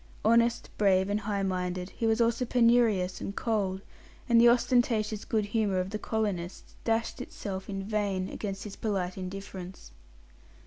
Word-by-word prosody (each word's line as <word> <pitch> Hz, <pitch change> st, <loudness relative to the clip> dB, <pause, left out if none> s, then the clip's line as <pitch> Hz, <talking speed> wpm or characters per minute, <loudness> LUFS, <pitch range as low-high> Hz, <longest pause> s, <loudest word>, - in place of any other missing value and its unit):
Honest, 235 Hz, +1 st, +3 dB
brave, 195 Hz, -1 st, +3 dB
and 205 Hz, -, +1 dB
high 200 Hz, -1 st, -2 dB
minded, 180 Hz, -1 st, -2 dB
he 230 Hz, -, -2 dB
was 225 Hz, +1 st, +2 dB
also 235 Hz, +1 st, +2 dB
penurious 230 Hz, -7 st, +3 dB
and 200 Hz, -, -5 dB
cold, 195 Hz, -4 st, -1 dB, 0.5 s
and 235 Hz, -2 st, +6 dB
the 240 Hz, -, +8 dB
ostentatious 235 Hz, -3 st, +2 dB
good 215 Hz, -2 st, 0 dB
humour 205 Hz, -3 st, 0 dB
of 185 Hz, +1 st, -3 dB
the 215 Hz, -, -3 dB
colonists 200 Hz, -6 st, -3 dB
dashed 225 Hz, 0 st, -1 dB
itself 190 Hz, -1 st, -6 dB
in 195 Hz, -1 st, -3 dB
vain 200 Hz, -2 st, -1 dB
against 195 Hz, -1 st, -5 dB
his 205 Hz, -2 st, -7 dB
polite 190 Hz, -4 st, -2 dB
indifference. 190 Hz, -1 st, -8 dB
205 Hz, 150 wpm, -29 LUFS, 190-225 Hz, 0.5 s, the